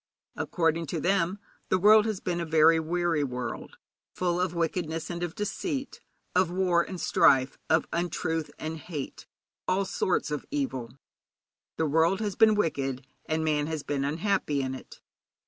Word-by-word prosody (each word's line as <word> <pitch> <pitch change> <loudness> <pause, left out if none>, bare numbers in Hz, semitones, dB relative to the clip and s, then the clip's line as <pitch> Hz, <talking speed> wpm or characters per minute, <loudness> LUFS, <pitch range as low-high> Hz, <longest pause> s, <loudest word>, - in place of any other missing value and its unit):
According 165 -1 0
to 165 +3 -2
them 190 +1 +1 0.3
the 185 - +3
world 210 +3 +6
has 215 -4 -2
been 175 -1 -2
a - - -1
very 160 0 +5
weary 165 -1 0
world, 125 -2 -5 0.4
full 180 -1 0
of 180 -1 -1
wickedness 165 -1 -2
and 170 0 -5
of 175 -1 -3
deceit, 270 - -3 0.3
of 185 -1 +3
war 180 -1 +2
and 180 +1 -6
strife, 135 -4 +3
of 160 -1 +3
untruth 165 -2 -1
and 155 +1 -4
of 160 - -7
hate, 150 -5 -7 0.4
of - - +1
all 195 - +1
sorts 185 -4 0
of 150 - -2
evil. 135 - -3 0.8
The 160 - +1
world 165 +6 +3
has 205 -4 -2
been 220 -1 +6
wicked, 135 -9 -1 0.2
and 160 0 0
man 150 -1 +1
has 155 -2 -3
been 140 -2 -2
unhappy 155 -1 0
in 130 0 -3
it. 130 - -10
165 Hz, 165 wpm, -28 LUFS, 155-185 Hz, 0.8 s, world